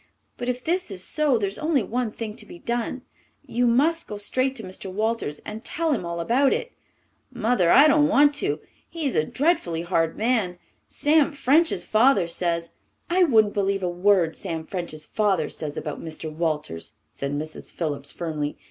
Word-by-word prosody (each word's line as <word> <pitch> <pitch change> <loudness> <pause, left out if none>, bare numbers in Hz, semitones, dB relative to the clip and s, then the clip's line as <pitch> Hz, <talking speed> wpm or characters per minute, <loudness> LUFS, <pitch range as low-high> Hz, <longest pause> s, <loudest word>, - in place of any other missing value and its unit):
But 245 0 -4
if 250 0 -2
this 355 -1 0
is 190 -2 -6
so, 295 -1 +2
there's 200 -2 -2
only 305 -5 +1
one 240 +3 -1
thing 215 0 -6
to 210 - -6
be - - -10
done. 240 +5 -3 0.4
You 245 +1 +1
must 310 +8 +2
go 210 - -5
straight 255 +6 0
to 225 - -6
Mr. 185 0 -7
Walters 215 -7 -1
and 215 +1 -7
tell 330 0 -1
him 265 - -2
all 170 0 -4
about 250 +10 +3
it." - - -3 0.6
"Mother, 235 -7 +2
I 280 - +8
don't 295 0 +5
dare 295 0 +6
to. 340 +9 -1 0.3
He 330 -2 -5
is 275 - 0
a 155 - +3
dreadfully 220 - 0
hard 165 -2 0
man. 220 -6 +1 0.3
Sam 305 +1 +3
French's 290 +4 +2
father 215 -5 +4
says 170 -1 -2 0.2
" - - -40
"I 365 +1 +5
wouldn't 220 -8 +4
believe 195 -1 0
a 180 - +1
word 180 -2 +2
Sam 165 -4 -5
French's 165 -5 -5
father 195 -7 0
says 150 -1 -6
about 150 -1 -4
Mr. 160 -1 -6
Walters!" 155 - -2 0.2
said 140 +1 -4
Mrs. 155 +2 -5
Phillips 145 -4 -3
firmly. 155 -3 -3
210 Hz, 185 wpm, -24 LUFS, 170-270 Hz, 0.6 s, I